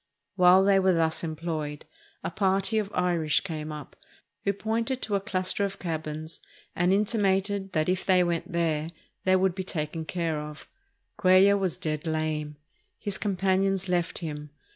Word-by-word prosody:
While 185 Hz, 0 st, +6 dB
they 195 Hz, 0 st, +5 dB
were 190 Hz, -1 st, +3 dB
thus 160 Hz, 0 st, +1 dB
employed, 155 Hz, -2 st, -4 dB, 0.4 s
a -, -, -3 dB
party 195 Hz, +2 st, +1 dB
of 205 Hz, -1 st, -3 dB
Irish 175 Hz, -5 st, +1 dB
came 155 Hz, -4 st, -5 dB
up, 150 Hz, -2 st, -8 dB, 0.5 s
who 200 Hz, -, +2 dB
pointed 225 Hz, +5 st, -2 dB
to 210 Hz, -, -3 dB
a 200 Hz, -, +3 dB
cluster 190 Hz, -1 st, 0 dB
of 195 Hz, -1 st, -2 dB
cabins 160 Hz, -2 st, -5 dB, 0.3 s
and 175 Hz, +1 st, +2 dB
intimated 200 Hz, -1 st, +1 dB
that 155 Hz, -1 st, +1 dB
if 185 Hz, +1 st, 0 dB
they 185 Hz, -2 st, +4 dB
went 170 Hz, -1 st, -2 dB
there 160 Hz, -2 st, 0 dB, 0.4 s
they 185 Hz, 0 st, +5 dB
would 190 Hz, -1 st, +2 dB
be 190 Hz, -, -4 dB
taken 160 Hz, -2 st, -3 dB
care 165 Hz, -2 st, -2 dB
of. 150 Hz, 0 st, -8 dB, 0.5 s
Cuellar 190 Hz, +2 st, +6 dB
was 185 Hz, -4 st, -1 dB
dead 155 Hz, 0 st, -3 dB
lame. 155 Hz, -1 st, -2 dB, 0.4 s
His 205 Hz, -2 st, -3 dB
companions 195 Hz, -1 st, +1 dB
left 175 Hz, -2 st, 0 dB
him. 150 Hz, -3 st, -5 dB
180 Hz, 160 wpm, -27 LUFS, 155-195 Hz, 0.5 s, While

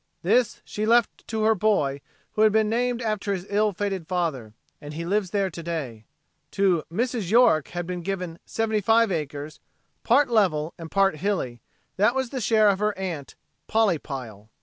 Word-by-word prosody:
This 230 Hz, +6 st, +2 dB
she 215 Hz, +1 st, -3 dB
left 235 Hz, -1 st, +2 dB
to 220 Hz, -1 st, -2 dB
her 220 Hz, +1 st, +5 dB
boy 175 Hz, -10 st, +1 dB, 0.3 s
who 215 Hz, -, -1 dB
had 215 Hz, 0 st, +6 dB
been 220 Hz, 0 st, +3 dB
named 240 Hz, +2 st, 0 dB
after 215 Hz, -2 st, -1 dB
his 185 Hz, -1 st, -4 dB
ill 210 Hz, +1 st, +2 dB
fated 195 Hz, -3 st, -3 dB
father 145 Hz, -, -2 dB, 0.3 s
and 150 Hz, 0 st, -8 dB
he 165 Hz, +1 st, -4 dB
lives 195 Hz, +1 st, 0 dB
there 195 Hz, 0 st, 0 dB
to 170 Hz, -, -7 dB
day. 140 Hz, -10 st, -5 dB, 0.5 s
To 190 Hz, -4 st, +2 dB
Mrs. 230 Hz, -1 st, -2 dB
York 205 Hz, -, +4 dB
had 175 Hz, -1 st, -5 dB
been 180 Hz, 0 st, -4 dB
given 180 Hz, -2 st, -4 dB
seventy 220 Hz, -1 st, -1 dB
five 225 Hz, +1 st, +3 dB
acres, 150 Hz, -2 st, -4 dB, 0.4 s
"part 270 Hz, +4 st, +4 dB
level 180 Hz, -9 st, +1 dB
and 165 Hz, -1 st, -8 dB
part 195 Hz, -3 st, +2 dB
hilly," 150 Hz, -, -2 dB, 0.4 s
that 210 Hz, +6 st, +3 dB
was 265 Hz, -2 st, -1 dB
the 260 Hz, -3 st, -3 dB
share 215 Hz, -1 st, +4 dB
of 195 Hz, -1 st, +1 dB
her 210 Hz, -1 st, 0 dB
aunt, 175 Hz, -7 st, -5 dB, 0.3 s
Polly 215 Hz, -7 st, +2 dB
Pile. 115 Hz, -8 st, -8 dB
195 Hz, 180 wpm, -25 LUFS, 160-220 Hz, 0.5 s, had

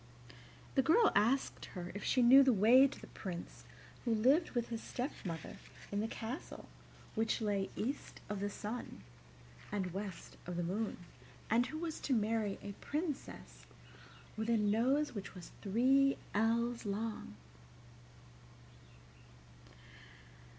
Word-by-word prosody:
The 270 Hz, -, +4 dB
girl 400 Hz, -, +5 dB
asked 240 Hz, +7 st, +2 dB
her 175 Hz, -2 st, -7 dB
if 205 Hz, -, -6 dB
she 255 Hz, -, +3 dB
knew 260 Hz, +3 st, +9 dB
the 265 Hz, -1 st, +5 dB
way 240 Hz, +6 st, +7 dB
to 275 Hz, -, -9 dB
the -, -, -10 dB
Prince 175 Hz, -4 st, -7 dB, 0.4 s
who 235 Hz, -2 st, +1 dB
lived 265 Hz, +10 st, +4 dB
with 235 Hz, -1 st, 0 dB
his 230 Hz, -1 st, -4 dB
stepmother 185 Hz, -, -5 dB, 0.3 s
in 200 Hz, -, 0 dB
the 220 Hz, -, 0 dB
castle 230 Hz, +5 st, -6 dB, 0.5 s
which 225 Hz, 0 st, 0 dB
lay 205 Hz, -3 st, 0 dB
east 260 Hz, +7 st, -4 dB
of 205 Hz, -1 st, -3 dB
the 205 Hz, +1 st, -1 dB
sun 215 Hz, -, -6 dB, 0.7 s
and 185 Hz, -4 st, -2 dB
west 195 Hz, -2 st, -6 dB
of 175 Hz, -, -4 dB
the 175 Hz, -, 0 dB
moon, 205 Hz, +6 st, -2 dB, 0.5 s
and 240 Hz, +2 st, +4 dB
who 310 Hz, -, -5 dB
was 325 Hz, -1 st, -4 dB
to 275 Hz, -, 0 dB
marry 215 Hz, -2 st, 0 dB
a 205 Hz, -, -5 dB
princess 65 Hz, -, -5 dB, 0.7 s
with 220 Hz, +1 st, -3 dB
a 230 Hz, -, +4 dB
nose 235 Hz, +8 st, +2 dB
which 200 Hz, -3 st, -6 dB
was 180 Hz, -2 st, -10 dB
three 265 Hz, +7 st, +3 dB, 0.2 s
ells 230 Hz, +2 st, +1 dB
long. 210 Hz, -, -4 dB
225 Hz, 135 wpm, -35 LUFS, 200-255 Hz, 0.7 s, knew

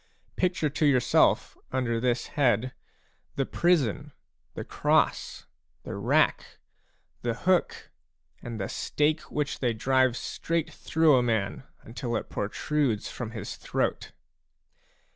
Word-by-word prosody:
Picture 180 Hz, -3 st, +1 dB
to 150 Hz, +2 st, 0 dB
yourself 130 Hz, -4 st, +3 dB, 0.2 s
under 120 Hz, -3 st, 0 dB
this 120 Hz, 0 st, 0 dB
head 125 Hz, -3 st, +2 dB, 0.6 s
the 135 Hz, -, 0 dB
prison, 155 Hz, -, +1 dB, 0.4 s
the -, -, -4 dB
cross, -, -, 0 dB, 0.4 s
the -, -, -6 dB
rack, -, -, +1 dB, 0.6 s
the 120 Hz, -1 st, -1 dB
hookj 180 Hz, +9 st, 0 dB, 0.5 s
and 115 Hz, -2 st, -6 dB
the 95 Hz, -, -2 dB
stake 150 Hz, +2 st, 0 dB
which 150 Hz, 0 st, -2 dB
they 120 Hz, -3 st, +1 dB
drive 130 Hz, +2 st, +2 dB
straight 165 Hz, -1 st, -2 dB
through 160 Hz, -4 st, +3 dB
a -, -, +4 dB
man 115 Hz, +3 st, -1 dB, 0.2 s
until 120 Hz, +1 st, -4 dB
it -, -, -4 dB
protrudes 120 Hz, +2 st, -1 dB
from 120 Hz, -3 st, -5 dB
his 110 Hz, -3 st, -6 dB
throat. -, -, -2 dB
130 Hz, 120 wpm, -27 LUFS, 115-150 Hz, 0.6 s, a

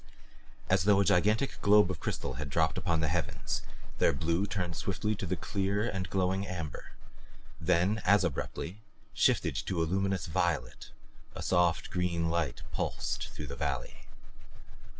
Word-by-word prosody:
As 95 Hz, -2 st, +3 dB
though 100 Hz, -1 st, +5 dB
a 100 Hz, -, +3 dB
gigantic 105 Hz, +10 st, +2 dB
globe 105 Hz, -2 st, +6 dB
of 90 Hz, -, -5 dB
crystal 70 Hz, -, -3 dB
had 75 Hz, -, -4 dB
dropped 80 Hz, +3 st, +2 dB
upon 80 Hz, -3 st, 0 dB
the 80 Hz, -, +1 dB
heavens, 80 Hz, +2 st, -2 dB, 0.4 s
their -, -, +4 dB
blue 85 Hz, +7 st, 0 dB
turned 90 Hz, -4 st, -2 dB
swiftly 100 Hz, +5 st, -1 dB
to 95 Hz, -4 st, -5 dB
a -, -, +3 dB
clear 100 Hz, +4 st, -1 dB
and 95 Hz, -5 st, -3 dB
glowing 95 Hz, +1 st, 0 dB
amber 85 Hz, -6 st, -6 dB, 0.7 s
then 90 Hz, +6 st, +2 dB
as 100 Hz, 0 st, +5 dB
abruptly 90 Hz, +4 st, -3 dB, 0.3 s
shifted -, -, +2 dB
to 95 Hz, -3 st, -1 dB
a -, -, +1 dB
luminous 95 Hz, +2 st, 0 dB
violet 80 Hz, -, -1 dB, 0.5 s
A -, -, -5 dB
soft 90 Hz, -2 st, +2 dB
green 85 Hz, -2 st, 0 dB
light 80 Hz, -7 st, -1 dB
pulsed -, -, -2 dB
through 75 Hz, -, -7 dB
the 70 Hz, -1 st, -6 dB
valley. 70 Hz, -2 st, -4 dB
90 Hz, 150 wpm, -31 LUFS, 80-95 Hz, 0.7 s, globe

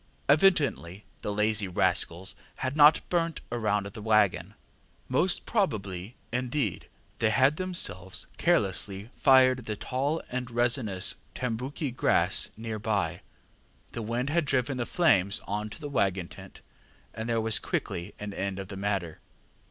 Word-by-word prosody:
Evidently 145 Hz, -, +2 dB, 0.2 s
the 105 Hz, -, -3 dB
lazy 105 Hz, 0 st, +1 dB
rascals 90 Hz, 0 st, +1 dB, 0.2 s
had 130 Hz, +1 st, -3 dB
not 150 Hz, 0 st, +6 dB
burnt 165 Hz, -2 st, 0 dB
round 105 Hz, -4 st, 0 dB
the 105 Hz, +2 st, -8 dB
waggon; 105 Hz, -3 st, +2 dB, 0.5 s
most 175 Hz, +8 st, 0 dB
probably, 105 Hz, -, -2 dB, 0.2 s
indeed, 125 Hz, -, -2 dB, 0.3 s
they 110 Hz, -, +3 dB
had 130 Hz, +6 st, +3 dB
themselves 170 Hz, -, -1 dB
carelessly 100 Hz, +2 st, +1 dB
fired 130 Hz, -2 st, +4 dB
the 105 Hz, -, -2 dB
tall 140 Hz, +8 st, -2 dB
and 125 Hz, 0 st, -3 dB
resinous 120 Hz, -5 st, 0 dB, 0.2 s
tambouki 130 Hz, +4 st, -3 dB
grass 120 Hz, -, +2 dB
near 110 Hz, -1 st, -5 dB
by; 105 Hz, -2 st, -1 dB, 0.7 s
the 115 Hz, -, -5 dB
wind 120 Hz, +5 st, -2 dB
had 170 Hz, 0 st, +1 dB
driven 135 Hz, -1 st, +1 dB
the 120 Hz, -2 st, -2 dB
flames 100 Hz, -, +2 dB
on 105 Hz, +2 st, -3 dB
to -, -, -10 dB
the 145 Hz, -, -6 dB
waggon 95 Hz, -10 st, 0 dB
tent, -, -, -12 dB, 0.5 s
and 110 Hz, +1 st, -5 dB
there 115 Hz, -1 st, +1 dB
was 110 Hz, -1 st, +3 dB
quickly 85 Hz, +4 st, -4 dB
an 105 Hz, -1 st, -5 dB
end 100 Hz, -1 st, -3 dB
of 95 Hz, -1 st, -7 dB
the 100 Hz, -, -7 dB
matter. 95 Hz, -5 st, -2 dB
115 Hz, 140 wpm, -28 LUFS, 100-130 Hz, 0.7 s, not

